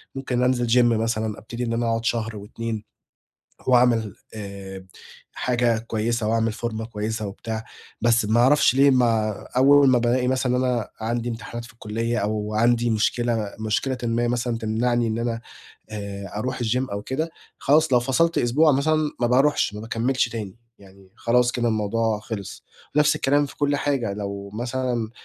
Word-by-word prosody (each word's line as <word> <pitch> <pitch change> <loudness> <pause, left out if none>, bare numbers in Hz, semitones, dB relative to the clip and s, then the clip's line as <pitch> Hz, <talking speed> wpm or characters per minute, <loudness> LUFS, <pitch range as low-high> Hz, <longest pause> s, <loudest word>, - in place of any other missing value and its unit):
ممكن 130 -2 -1
أنزِل 125 -1 +1
Gym 120 - +4
مثلًا، 110 -2 -1
ابتدي 120 +3 -6
إن 115 - -2
أنا 115 0 0
أقعد 115 0 -1
شهر 115 -2 -1
و2، 110 +2 -5 0.8
وأعمل 120 -5 +3 0.2
آآ، 100 -2 -8 0.5
حاجة 120 -2 +1
كويسة 115 0 -1
وأعمل 115 0 +1
فورمة 110 0 -4
كويسة 110 -1 -3
وبتاع، 110 +3 -5 0.4
بس 120 0 +3
ما 110 +3 +2
أعرفش 140 +1 +4
ليه 140 +1 +6
ما 115 -4 +3 0.3
أول 140 +1 +6
ما 130 - +5
بالاقي 125 +1 +1
مثلًا 130 -1 +1
أنا 125 -3 0
عندي 120 +2 -2
امتحانات 115 0 -6
في - - -15
الكلية 115 +1 -3
أو 105 +1 -2
عندي 120 +1 +3
مشكلة 110 -1 0
مشكلةً 110 +4 -1
ما 120 0 +1
مثلًا 120 -1 -1
تمنعني 115 +2 0
إن 110 +1 -2
أنا 115 -1 -2 0.5
آآ، 100 -2 -6
أروح 125 +4 -3
الGym 125 +3 0
أو 100 0 -3
كده، 155 +8 -2 0.3
خلاص 150 +1 +3
لو 125 - +5
فصَلت 165 +7 +1
أسبوع 150 +6 +4
مثلًا 155 +2 +1
ما 120 - +3
باروحش، 130 -2 +2
ما 105 - -6
باكمّلش 120 +4 0
تاني، 110 -2 -6 0.2
يعني 95 -1 -18
خلاص 120 +1 +2
كده 120 -1 0
الموضوع 110 0 0
خِلص. 105 -3 -7 0.3
نفْس 150 +1 +4
الكلام 145 0 +2
في - - -13
كلّ 145 0 +1
حاجة 135 -8 -1
لو 100 -1 -5
مثلًا، 120 -1 -2
115 Hz, 160 wpm, -23 LUFS, 110-125 Hz, 0.8 s, ليه